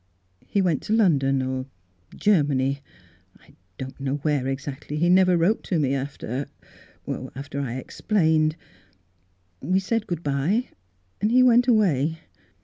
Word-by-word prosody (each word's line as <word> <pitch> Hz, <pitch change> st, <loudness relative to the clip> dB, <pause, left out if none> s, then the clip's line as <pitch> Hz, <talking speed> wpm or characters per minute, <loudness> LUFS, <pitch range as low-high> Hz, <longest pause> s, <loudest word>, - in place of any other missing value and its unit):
He 200 Hz, -, +1 dB
went 170 Hz, -6 st, +1 dB
to 215 Hz, -, -2 dB
London, 135 Hz, -11 st, +3 dB
or 130 Hz, 0 st, -3 dB, 0.5 s
Ger 200 Hz, -7 st, +3 dB
many 135 Hz, -1 st, 0 dB, 0.3 s
— 95 Hz, +2 st, -30 dB
I -, -, -22 dB, 0.2 s
don't 130 Hz, +1 st, -7 dB
know 135 Hz, 0 st, -1 dB
where 145 Hz, -2 st, -1 dB
exactly. 140 Hz, +2 st, -5 dB
He 170 Hz, +3 st, +2 dB
never 185 Hz, -1 st, +5 dB
wrote 180 Hz, +7 st, +2 dB
to 180 Hz, -, 0 dB
me 140 Hz, -3 st, +1 dB
after 135 Hz, -1 st, -4 dB, 0.4 s
— -, -, -8 dB
after 140 Hz, +1 st, -6 dB
I 125 Hz, -3 st, -4 dB
ex 130 Hz, -, -9 dB
plained 160 Hz, -6 st, +2 dB, 0.6 s
— 90 Hz, 0 st, -42 dB
We 190 Hz, -, +4 dB
said 225 Hz, +3 st, -2 dB
good 170 Hz, -2 st, -4 dB
bye, 150 Hz, -, 0 dB, 0.5 s
and 210 Hz, -, +1 dB
he 255 Hz, +1 st, +6 dB
went 245 Hz, 0 st, +5 dB
away." 165 Hz, -, +2 dB
145 Hz, 155 wpm, -24 LUFS, 135-185 Hz, 0.6 s, he